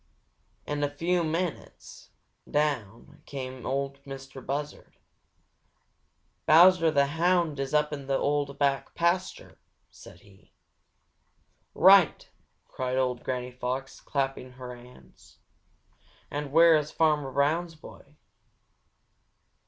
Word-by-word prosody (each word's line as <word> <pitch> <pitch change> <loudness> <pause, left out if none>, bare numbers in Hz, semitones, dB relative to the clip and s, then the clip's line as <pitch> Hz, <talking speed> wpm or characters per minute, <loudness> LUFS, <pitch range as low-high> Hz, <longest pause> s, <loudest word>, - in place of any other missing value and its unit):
In 145 0 -3
a 145 - +1
few 170 +4 -1
minutes 165 +1 -5 0.4
down 130 -8 -2
came 130 -2 -7
Ol' 140 +1 -2
Mistah 135 -1 -10
Buzzard. 145 +3 -6 1.5
"Bowser 170 +1 +6
the 140 -2 +3
Hound 165 0 +1
is 135 -1 -3
up 150 0 +1
in 140 -2 -7
the 135 -1 +1
old 145 -1 -1
back 140 -1 -1
pasture," 175 +2 -2 0.3
said - - -15
he. 100 -1 -22 1.2
"Right!" 190 -2 +5 0.4
cried 130 0 -3
old 125 -2 -1
Granny 125 -1 -4
Fox, 130 +2 -5
clapping 135 -2 -3
her 125 -1 -9
hands. 120 - -18 0.9
"And 145 -1 -4
where 165 +1 +6
is 150 -1 0
Farmer 150 -4 +1
Brown's 160 +5 0
boy?" 150 -1 -15
140 Hz, 105 wpm, -27 LUFS, 130-160 Hz, 1.5 s, Bowser